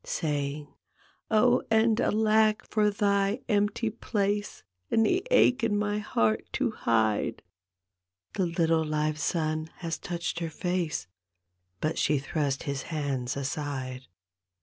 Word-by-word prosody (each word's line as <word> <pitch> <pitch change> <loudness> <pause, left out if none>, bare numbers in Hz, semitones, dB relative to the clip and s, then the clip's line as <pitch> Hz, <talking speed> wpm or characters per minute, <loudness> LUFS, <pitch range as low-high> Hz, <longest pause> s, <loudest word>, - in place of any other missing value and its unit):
Saying, 145 -2 -3 0.3
" - - -29 0.3
Oh 245 +3 +4
and 220 0 +3
alack, 215 0 +3
for 210 -1 +2
thy 200 +2 +1
empty 215 +1 +1
place 205 -2 -2 0.3
And 225 - +3
the 365 - +1
ache 255 - +4
in 210 -3 +2
my 205 0 0
heart 110 - +1
to - - 0
hide! 110 0 0 0.4
" 90 -1 -56
The 185 - 0
little 165 -1 +2
live 155 0 -1
son 155 -1 -1
has 165 -2 -4
touched 170 -1 -3
her 165 -1 -3
face, 170 - -2 0.8
But 155 - -1
she 150 - +2
thrust 140 -1 -2
his 140 -1 -3
hands 140 -5 -2
aside. 130 -2 -4
165 Hz, 130 wpm, -28 LUFS, 140-210 Hz, 0.8 s, Oh